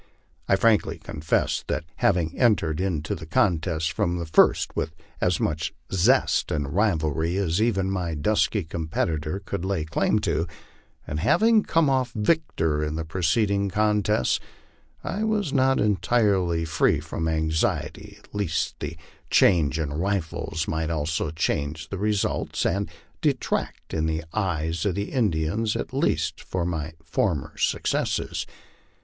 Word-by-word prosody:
I 95 Hz, -, +4 dB
frankly 110 Hz, +2 st, +2 dB
confess 75 Hz, +2 st, -1 dB
that -, -, -1 dB
having 85 Hz, -2 st, +1 dB
entered 90 Hz, -9 st, +2 dB
into 80 Hz, -6 st, -1 dB
the 80 Hz, -1 st, -7 dB
contest 80 Hz, -3 st, +1 dB
from 90 Hz, -5 st, 0 dB
the 85 Hz, -, -3 dB
first 80 Hz, -, +3 dB
with 80 Hz, -, -2 dB, 0.3 s
as 90 Hz, -2 st, +2 dB
much 80 Hz, +2 st, -1 dB, 0.2 s
zest 95 Hz, -2 st, +3 dB
and 70 Hz, -2 st, -2 dB
rivalry 85 Hz, -4 st, +1 dB
as 95 Hz, -1 st, +1 dB
even 100 Hz, -4 st, +1 dB
my 90 Hz, -4 st, -2 dB
dusky 105 Hz, +5 st, +1 dB
competitor 80 Hz, +1 st, -2 dB
could 100 Hz, -2 st, -3 dB
lay 95 Hz, -5 st, -1 dB
claim 80 Hz, -, +1 dB
to, 80 Hz, +3 st, 0 dB, 0.6 s
and 75 Hz, -, -3 dB
having 220 Hz, -, +4 dB
come 165 Hz, -6 st, +2 dB
off 130 Hz, -3 st, +1 dB
victor 95 Hz, -, +1 dB
in 75 Hz, 0 st, -2 dB
the 80 Hz, 0 st, -3 dB
preceding 100 Hz, +4 st, +1 dB
contests, 105 Hz, -6 st, +2 dB, 0.6 s
I 205 Hz, +3 st, -2 dB
was 210 Hz, -8 st, 0 dB
not 130 Hz, -1 st, +3 dB
entirely 100 Hz, -5 st, +2 dB
free 80 Hz, -2 st, +2 dB
from 80 Hz, -, -4 dB
anxiety 80 Hz, 0 st, -1 dB, 0.2 s
lest 100 Hz, -6 st, -1 dB
the 80 Hz, -, -5 dB, 0.3 s
change 80 Hz, -6 st, +4 dB
in 75 Hz, -3 st, -2 dB
rifles 80 Hz, -2 st, -2 dB
might 80 Hz, 0 st, -1 dB
also 80 Hz, -1 st, -1 dB
change 80 Hz, 0 st, -2 dB
the 100 Hz, -, -4 dB
result, 105 Hz, -1 st, 0 dB
and 100 Hz, +3 st, 0 dB, 0.3 s
detract, -, -, -1 dB
in 80 Hz, 0 st, 0 dB
the 80 Hz, +1 st, -1 dB
eyes 85 Hz, -5 st, -1 dB
of 100 Hz, -4 st, 0 dB
the 100 Hz, 0 st, -3 dB
Indians 105 Hz, -1 st, 0 dB
at -, -, -4 dB
least, -, -, 0 dB
from 90 Hz, -2 st, -2 dB
my 80 Hz, -2 st, -3 dB
former 85 Hz, -3 st, -1 dB
successes. -, -, -1 dB
85 Hz, 140 wpm, -25 LUFS, 80-105 Hz, 0.6 s, I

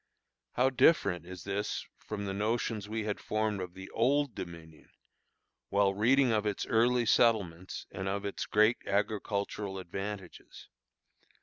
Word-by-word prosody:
How 130 Hz, +2 st, +3 dB
different 100 Hz, -, +3 dB
is 90 Hz, -2 st, -8 dB
this 100 Hz, +1 st, -2 dB
from 100 Hz, -1 st, -5 dB
the 95 Hz, -, -2 dB
notions 105 Hz, 0 st, -1 dB
we 110 Hz, 0 st, -2 dB
had 105 Hz, -1 st, -2 dB
formed 110 Hz, -2 st, -1 dB
of 90 Hz, -1 st, -7 dB
the 95 Hz, 0 st, -8 dB
Old 140 Hz, +3 st, +2 dB
Dominion, 85 Hz, -5 st, -9 dB, 0.8 s
while 100 Hz, -1 st, +3 dB
reading 125 Hz, +5 st, +4 dB
of 105 Hz, -2 st, +2 dB
its 105 Hz, -, -1 dB
early 120 Hz, +1 st, +3 dB
settlements, 100 Hz, -7 st, +2 dB
and 95 Hz, -, -4 dB
of 100 Hz, +1 st, -2 dB
its 100 Hz, -, -3 dB
great 110 Hz, +3 st, +4 dB
agricultural 100 Hz, -1 st, -1 dB
advantages. 95 Hz, +1 st, -7 dB
105 Hz, 135 wpm, -31 LUFS, 95-110 Hz, 0.8 s, reading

